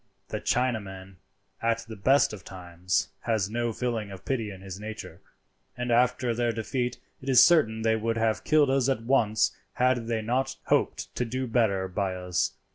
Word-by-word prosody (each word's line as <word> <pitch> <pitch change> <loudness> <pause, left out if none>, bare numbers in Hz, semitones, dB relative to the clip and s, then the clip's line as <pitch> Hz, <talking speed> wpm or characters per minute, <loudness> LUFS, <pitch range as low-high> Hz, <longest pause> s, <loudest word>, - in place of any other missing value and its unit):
The - - -4
Chinaman, 100 -7 -2 0.4
at 115 0 0
the 110 - -7
best 130 +5 +3
of 100 -5 -9
times, 90 -1 -2 0.2
has 110 -4 0
no 120 0 -1
feeling 115 -2 -2
of 95 -2 -10
pity 115 -6 -1
in 95 -2 -10
his 95 -1 -8
nature; 110 +1 -8 0.6
and 125 0 -2
after 125 0 +2
their 120 0 0
defeat 120 +2 -2 0.2
it 135 - -5
is 130 - +8
certain 110 -10 +3
they 110 0 +3
would 115 +1 -1
have 110 -1 0
killed 150 -3 +4
us 135 -1 +2
at 130 -4 0
once 115 -4 +2 0.2
had 125 -2 +1
they 115 -2 -1
not 125 +4 0
hoped - - 0
to - - -1
do 130 +2 -3
better 110 -6 +1
by 95 0 -2
us. 90 -1 -1
115 Hz, 180 wpm, -27 LUFS, 100-125 Hz, 0.6 s, is